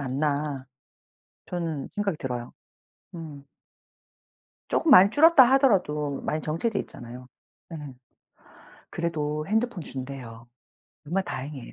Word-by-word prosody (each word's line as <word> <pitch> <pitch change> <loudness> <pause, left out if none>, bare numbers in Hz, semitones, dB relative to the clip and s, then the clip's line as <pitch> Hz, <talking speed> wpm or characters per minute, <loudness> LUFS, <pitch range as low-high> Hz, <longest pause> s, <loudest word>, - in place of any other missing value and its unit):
않나 140 0 -2 0.8
저는 165 -5 -4
생각이 200 -5 -2
들어요. 125 -3 -5 0.6
음. 150 -4 -9 1.2
쪼금 320 - +1
많이 200 -5 +9
줄었다 315 -2 +7
하더라도 150 - +2
많이 155 - -2
정체돼 200 +8 -1
있잖아요. 125 +1 -9 0.4
네. 165 - -6 1.1
그래도 155 -3 -2
핸드폰 220 -3 0
준대요. 130 -4 -7 0.6
정말 185 +5 -1
다행이에요. 135 -1 -6
150 Hz, 245 characters per minute, -26 LUFS, 135-190 Hz, 1.2 s, 많이